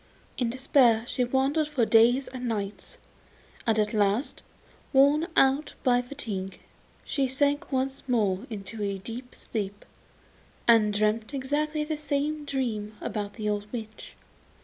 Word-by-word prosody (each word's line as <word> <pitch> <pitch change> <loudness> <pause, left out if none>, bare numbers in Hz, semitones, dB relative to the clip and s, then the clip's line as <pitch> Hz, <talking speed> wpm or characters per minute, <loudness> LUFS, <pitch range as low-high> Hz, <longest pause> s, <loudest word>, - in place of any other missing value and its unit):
In 245 -3 0
despair 245 -3 +3
she 255 - 0
wandered 270 +5 +1
about 300 - -16
for 240 -4 +3
days 235 +4 +5
and 250 -1 -5
nights, 205 -3 -4 0.7
and 225 -1 +3
at 210 0 +1
last, 210 +6 +1 0.5
worn 285 +4 +5
out 270 +3 +3
by 245 -2 +4
fatigue, 210 -8 -6 0.5
she 275 -2 0
sank 285 +3 0
once 265 0 -2
more 210 -2 +1
into 210 0 -6
a 200 -1 -1
deep 235 +6 -8
sleep, 205 -2 -5 0.8
and 225 -3 +6
dreamt 215 +5 0
exactly 300 +3 -1
the 305 0 -3
same 295 0 -2
dream 220 -7 -3
about 205 -2 -4
the 215 -2 -3
old 210 0 -2
witch. 220 -3 -7
245 Hz, 140 wpm, -27 LUFS, 210-275 Hz, 0.8 s, and